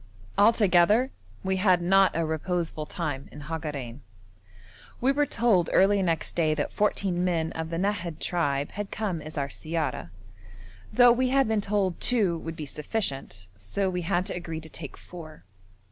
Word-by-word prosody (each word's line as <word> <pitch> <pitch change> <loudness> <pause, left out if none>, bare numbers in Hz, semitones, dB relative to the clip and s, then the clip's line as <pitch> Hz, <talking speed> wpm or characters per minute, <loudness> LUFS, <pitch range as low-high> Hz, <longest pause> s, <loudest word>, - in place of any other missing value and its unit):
Altogether 205 +2 +4 0.3
we 190 0 0
had 185 -2 +4
not 195 +2 +4
a 165 0 +1
reposeful 160 -1 -2
time 145 -6 -4
in 150 - -10
Hagarein. 145 -5 -5 1.0
We 260 +3 +3
were 290 +1 +1
told 210 -10 +2
early 200 +1 +4
next 165 -4 -1
day 155 -3 +2
that 145 - -2
fourteen 195 -4 0
men 165 -3 0
of 160 0 -4
the 165 - -3
Nahad 180 -4 -1
tribe 145 -5 -1
had 205 0 -5
come 195 -7 -3
as 155 +1 -8
our 140 -1 -1
siyara, 160 - -3 0.8
though 245 -1 +7
we 255 +2 +2
had 270 -1 +3
been 220 -1 +1
told 200 -3 0
two 200 -9 +2
would 165 0 -6
be 155 - -6
sufficient; 135 - -4
so 185 - -2
we 180 0 -2
had 175 +1 0
to - - -3
agree 165 -2 -5
to 160 - -11
take 150 -2 -8
four. 155 - -11
175 Hz, 165 wpm, -27 LUFS, 155-200 Hz, 1.0 s, though